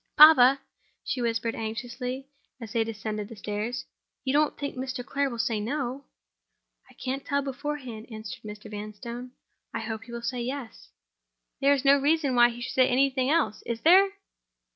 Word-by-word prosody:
"Papa!" 275 Hz, -3 st, +9 dB, 0.4 s
she 255 Hz, -, -2 dB
whispered 230 Hz, -1 st, 0 dB
anxiously, 245 Hz, +4 st, -4 dB, 0.3 s
as 225 Hz, -4 st, -8 dB
they 230 Hz, -, +3 dB
descended 215 Hz, -1 st, -4 dB
the 230 Hz, -, -9 dB
stairs; 210 Hz, +4 st, -3 dB, 0.4 s
"you 265 Hz, -, 0 dB
don't 300 Hz, 0 st, +2 dB
think 285 Hz, -1 st, -4 dB
Mr. 255 Hz, -1 st, -4 dB
Clare 280 Hz, +2 st, 0 dB
will 240 Hz, -, -6 dB
say 225 Hz, -1 st, 0 dB
No?" 260 Hz, +4 st, -3 dB, 0.8 s
"I -, -, -19 dB
can't 270 Hz, +1 st, -4 dB
tell 280 Hz, 0 st, 0 dB
beforehand," 270 Hz, -4 st, -5 dB
answered 215 Hz, -2 st, -7 dB
Mr. 210 Hz, 0 st, -9 dB
Vanstone. 225 Hz, +4 st, -7 dB, 0.4 s
"I 230 Hz, -, -2 dB
hope 220 Hz, 0 st, -5 dB
he 240 Hz, -, -12 dB
will 235 Hz, 0 st, -6 dB
say 250 Hz, 0 st, -2 dB
Yes." 255 Hz, -1 st, -6 dB, 0.7 s
"There 280 Hz, 0 st, +5 dB
is 275 Hz, 0 st, -4 dB
no 280 Hz, +1 st, +7 dB
reason 290 Hz, -1 st, +2 dB
why 240 Hz, -1 st, +6 dB
he 240 Hz, 0 st, -8 dB
should 240 Hz, -, -4 dB
say 255 Hz, -1 st, +5 dB
anything 260 Hz, 0 st, +2 dB
else—is 235 Hz, -7 st, 0 dB
there?" 380 Hz, +4 st, +7 dB
250 Hz, 165 wpm, -27 LUFS, 225-275 Hz, 0.8 s, Papa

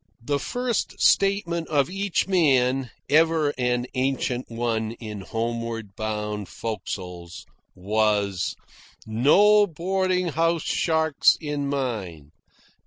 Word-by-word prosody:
The 140 Hz, +3 st, 0 dB
first 245 Hz, -, -2 dB
statement 185 Hz, -4 st, +2 dB
of 145 Hz, -3 st, +2 dB
each 195 Hz, +1 st, -1 dB
man 135 Hz, -8 st, +2 dB, 0.2 s
ever 155 Hz, 0 st, +3 dB
an 125 Hz, -1 st, 0 dB
ancient 130 Hz, -1 st, -1 dB
one 115 Hz, -1 st, -2 dB
in 110 Hz, -3 st, -8 dB
homeward 115 Hz, -1 st, -4 dB
bound 105 Hz, -2 st, -4 dB
forecastles 90 Hz, -6 st, -6 dB, 0.3 s
was: 100 Hz, -1 st, 0 dB, 0.5 s
"No 205 Hz, -, +5 dB
boarding 185 Hz, +1 st, -1 dB
house 165 Hz, +1 st, +1 dB
sharks 160 Hz, -2 st, +2 dB
in 145 Hz, -3 st, -3 dB
mine." 105 Hz, -, -4 dB
130 Hz, 100 wpm, -24 LUFS, 110-165 Hz, 0.5 s, No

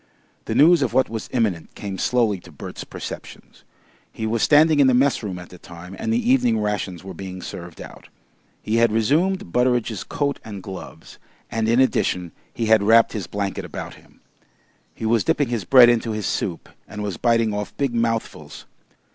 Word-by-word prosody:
The -, -, -3 dB
news 170 Hz, +4 st, +6 dB
of -, -, 0 dB
what 130 Hz, -, +3 dB
was 110 Hz, -1 st, -5 dB
imminent 100 Hz, -10 st, -1 dB
came 100 Hz, -2 st, -6 dB
slowly 115 Hz, -6 st, +1 dB
to -, -, -15 dB
Bert's -, -, -8 dB
perceptions. -, -, -9 dB, 0.5 s
He 110 Hz, -, -5 dB
was 110 Hz, 0 st, -1 dB
standing 155 Hz, 0 st, +5 dB
in 140 Hz, -, +6 dB
the 130 Hz, -, +4 dB
messroom 120 Hz, -8 st, +1 dB
at 90 Hz, -1 st, -10 dB
the 90 Hz, -, -13 dB
time 90 Hz, +2 st, -11 dB
and 225 Hz, -, -2 dB
the 235 Hz, +2 st, +1 dB
evening 120 Hz, -, +3 dB
rations 105 Hz, -4 st, -3 dB
were 95 Hz, 0 st, -8 dB
being 95 Hz, +1 st, -8 dB
served 85 Hz, -2 st, -9 dB
out. -, -, -11 dB, 0.5 s
He 110 Hz, +2 st, 0 dB
had 115 Hz, -1 st, +4 dB
resumed 145 Hz, -, +1 dB
Butteridge's 125 Hz, -2 st, +1 dB
coat 140 Hz, -1 st, -2 dB
and 100 Hz, -4 st, -8 dB
gloves, 95 Hz, -1 st, -10 dB, 0.3 s
and 110 Hz, 0 st, 0 dB
in 120 Hz, +2 st, +3 dB
addition 90 Hz, -9 st, +1 dB, 0.2 s
he 115 Hz, -, -3 dB
had 110 Hz, -1 st, +5 dB
wrapped 115 Hz, +2 st, +5 dB
his 105 Hz, -5 st, -4 dB
blanket 100 Hz, -1 st, -3 dB
about -, -, -7 dB
him. -, -, -21 dB, 0.7 s
He -, -, -6 dB
was 110 Hz, -2 st, +2 dB
dipping 140 Hz, +7 st, +1 dB
his 115 Hz, -6 st, -2 dB
bread 130 Hz, -3 st, +8 dB
into 115 Hz, -1 st, +1 dB
his 105 Hz, -2 st, -3 dB
soup 85 Hz, -3 st, -3 dB, 0.2 s
and 105 Hz, 0 st, -6 dB
was 100 Hz, -4 st, -4 dB
biting 115 Hz, -2 st, +2 dB
off 105 Hz, 0 st, -5 dB
big 140 Hz, -4 st, -1 dB
mouthfuls. 115 Hz, -1 st, -3 dB
110 Hz, 185 wpm, -22 LUFS, 100-125 Hz, 0.7 s, bread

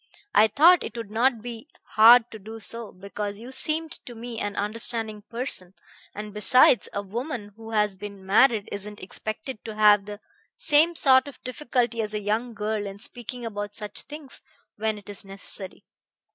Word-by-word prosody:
I 215 Hz, -, +6 dB
thought 320 Hz, -, +5 dB
it -, -, -7 dB
would 225 Hz, -3 st, -6 dB
not 230 Hz, 0 st, +1 dB
be 235 Hz, +2 st, -8 dB, 0.2 s
hard 230 Hz, +2 st, +7 dB
to 220 Hz, -, -9 dB
do 220 Hz, +3 st, -9 dB
so, 230 Hz, 0 st, -5 dB
because 200 Hz, +2 st, -6 dB
you 240 Hz, +4 st, -10 dB
seemed 310 Hz, +4 st, -1 dB, 0.2 s
to 240 Hz, -, -8 dB
me 230 Hz, 0 st, -7 dB
an 205 Hz, -1 st, -3 dB
understanding 215 Hz, 0 st, 0 dB
person, 230 Hz, -7 st, -1 dB, 0.4 s
and 210 Hz, 0 st, -7 dB
besides, 240 Hz, +3 st, +4 dB
a 200 Hz, -, -3 dB
woman 230 Hz, +1 st, -5 dB
who 225 Hz, 0 st, -11 dB
has 210 Hz, -3 st, +1 dB
been 200 Hz, 0 st, -9 dB
married 215 Hz, +2 st, +4 dB
isn't 205 Hz, +1 st, -6 dB
expected 215 Hz, +5 st, -5 dB
to 220 Hz, -2 st, -7 dB
have 210 Hz, -2 st, +5 dB
the 205 Hz, 0 st, -8 dB, 0.4 s
same 330 Hz, -7 st, +3 dB
sort 260 Hz, -3 st, +4 dB
of 285 Hz, -, -10 dB
difficulty 245 Hz, -3 st, -1 dB
as 215 Hz, -1 st, -4 dB
a -, -, -1 dB
young 220 Hz, +3 st, -2 dB
girl 210 Hz, 0 st, -2 dB
in 195 Hz, 0 st, -8 dB
speaking 240 Hz, +2 st, -6 dB
about 205 Hz, -2 st, -5 dB
such 210 Hz, -2 st, -2 dB
things 295 Hz, -2 st, -9 dB, 0.3 s
when 220 Hz, 0 st, -1 dB
it 205 Hz, -, -14 dB
is 205 Hz, -1 st, -8 dB
necessary. 195 Hz, 0 st, -2 dB
220 Hz, 175 wpm, -25 LUFS, 205-245 Hz, 0.4 s, hard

